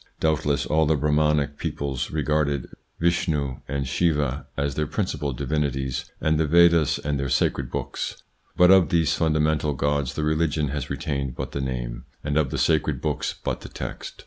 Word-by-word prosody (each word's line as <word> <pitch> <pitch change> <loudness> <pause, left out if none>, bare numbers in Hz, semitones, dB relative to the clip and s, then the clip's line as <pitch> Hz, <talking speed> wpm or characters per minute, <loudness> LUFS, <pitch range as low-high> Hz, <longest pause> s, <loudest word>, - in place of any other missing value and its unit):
Doubtless 75 -3 +1
all 80 0 +2
the 80 - +3
Brahmanic 75 0 +1
peoples 70 -3 -3
regard 75 -3 0 0.3
Vishnou 75 -6 0
and 70 -1 -2
Siva 70 -3 0
as 70 0 0
their 75 +3 -1
principal 75 -5 -2
divinities 70 -1 -2
and 80 0 +1
the 80 - +2
Vedas 85 -1 +5
as 75 -1 -2
their 70 0 -2
sacred 65 0 +1
books; - - -4 0.3
but 90 +1 +7
of 95 -5 +6
these 80 -3 +2
funda 80 -1 +1
mental 75 -1 +1
gods 70 0 0
the 75 - -1
religion 75 -1 +1
has 70 -2 -4
retained 70 -4 -3
but 65 0 -5
the 70 - -3
name, - - -4 0.2
and 75 -1 -2
of 75 -3 +2
the - - -3
sacred 80 -2 +2
books 75 -2 -2
but - - -2
the - - -9
text. - - -7
75 Hz, 170 wpm, -24 LUFS, 70-80 Hz, 0.3 s, but